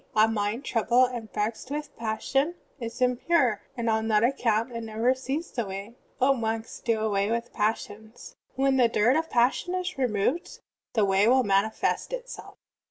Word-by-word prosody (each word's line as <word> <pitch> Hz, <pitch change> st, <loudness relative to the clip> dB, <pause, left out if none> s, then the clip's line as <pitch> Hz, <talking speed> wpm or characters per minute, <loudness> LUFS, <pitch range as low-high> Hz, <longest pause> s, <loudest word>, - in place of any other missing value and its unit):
A 215 Hz, 0 st, +6 dB
mind 220 Hz, +3 st, -1 dB
troulDled 245 Hz, +1 st, +2 dB
and 225 Hz, -3 st, -7 dB
vexed 220 Hz, +4 st, -3 dB
with 295 Hz, +1 st, -3 dB
the -, -, -22 dB
passions 270 Hz, +8 st, 0 dB, 0.2 s
is 230 Hz, +1 st, -6 dB
impiire, 250 Hz, -2 st, +2 dB, 0.2 s
and 235 Hz, -1 st, -2 dB
on 220 Hz, 0 st, +1 dB
that 215 Hz, -1 st, +3 dB
account 230 Hz, -2 st, +1 dB
it 230 Hz, -1 st, -5 dB
never 225 Hz, +3 st, +1 dB
sees 270 Hz, +5 st, -4 dB
the 235 Hz, -, -2 dB
Way. 195 Hz, +2 st, -7 dB, 0.3 s
O 270 Hz, +1 st, +4 dB
monks, 225 Hz, -2 st, -3 dB
do 230 Hz, -2 st, 0 dB
away 205 Hz, -2 st, +1 dB
with 235 Hz, +1 st, -2 dB
passions. 215 Hz, +1 st, -3 dB, 0.2 s
When 270 Hz, 0 st, +2 dB
the 245 Hz, -2 st, +5 dB
dirt 230 Hz, +3 st, +3 dB
of 320 Hz, +1 st, 0 dB
passion 250 Hz, +9 st, +1 dB
is 365 Hz, -6 st, -3 dB
removed 250 Hz, -, 0 dB, 0.4 s
the 215 Hz, -3 st, +3 dB
Way 195 Hz, +2 st, +3 dB
will 260 Hz, +2 st, +5 dB
manifest 200 Hz, -, 0 dB
itself." -, -, -7 dB
230 Hz, 170 wpm, -27 LUFS, 220-260 Hz, 0.4 s, A